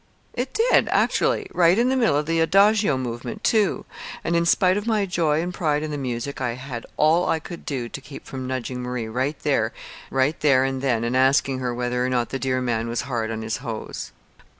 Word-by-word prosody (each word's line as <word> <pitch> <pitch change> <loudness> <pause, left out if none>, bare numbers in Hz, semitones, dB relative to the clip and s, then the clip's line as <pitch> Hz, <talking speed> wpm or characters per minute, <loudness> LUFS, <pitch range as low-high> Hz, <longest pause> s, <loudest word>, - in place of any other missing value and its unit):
It 250 +2 -3
did, 460 +3 +4
actually - - +2
right 175 +1 +4
in 240 +2 +3
the 265 - +2
middle 235 - +3
of 150 - 0
the 165 +1 0
adagio 200 -1 +4
movement, 125 - -5
too. 215 -4 +2 0.4
And 170 - 0
in 170 0 +2
spite 185 +1 +4
of 205 +2 -3
my 215 -3 +2
joy 165 -4 +1
and 180 +1 -4
pride 150 -3 0
in 155 - -4
the - - -3
music 130 +1 -4
I 125 -2 -1
had 125 -1 -7
all 165 +3 +3
I - - +2
could 170 +2 -10
do 130 -5 -2
to 140 - -8
keep 145 0 -11
from 130 -1 -6
nudging 130 -1 -3
Marie 125 -2 -3
right 130 +6 -2
there 120 -6 +1 0.4
and 135 -1 +2
then 120 -4 +1
and 120 +2 -1
asking 130 0 +3
her 125 -1 -2
whether 125 +1 -1
or 130 - 0
not 120 -2 0
the 135 - -3
dear 130 0 0
man 115 -2 -1
was 115 0 -1
hard 120 -5 -2
on 110 0 -4
his 110 -1 -2
hose." - - -6
135 Hz, 215 wpm, -23 LUFS, 125-170 Hz, 0.4 s, did